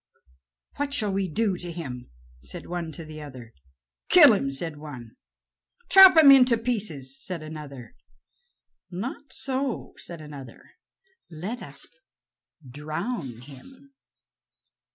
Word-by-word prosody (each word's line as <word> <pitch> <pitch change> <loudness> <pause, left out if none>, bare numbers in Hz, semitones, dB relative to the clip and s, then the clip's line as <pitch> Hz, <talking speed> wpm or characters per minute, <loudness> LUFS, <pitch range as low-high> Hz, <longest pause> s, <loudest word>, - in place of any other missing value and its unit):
"What 285 0 -2
shall 210 -7 +1
we 195 -1 -1
do 195 +2 -1
to 175 -1 -7
him?" 130 -8 -7 0.3
said - - -10
one 170 -2 -5
to 165 - -9
the 155 0 -9
others. 130 -6 -11 0.6
"Kill 300 -9 +8
him," 135 -9 -1
said 150 +2 -5
one. 130 -7 -10 0.8
"Chop 385 -3 +9
him 300 -3 +9
into 250 -3 +6
pieces," 170 - -4
said 175 -4 -6
another. 150 - -9 1.0
"Not 255 +9 -6
so," 265 -2 -3
said 170 -2 -9
another; 145 -5 -12 0.6
"let 185 +10 -6
us - - -9 0.8
drown 150 - -5
him." 205 - -15
170 Hz, 115 wpm, -25 LUFS, -, 1.0 s, Chop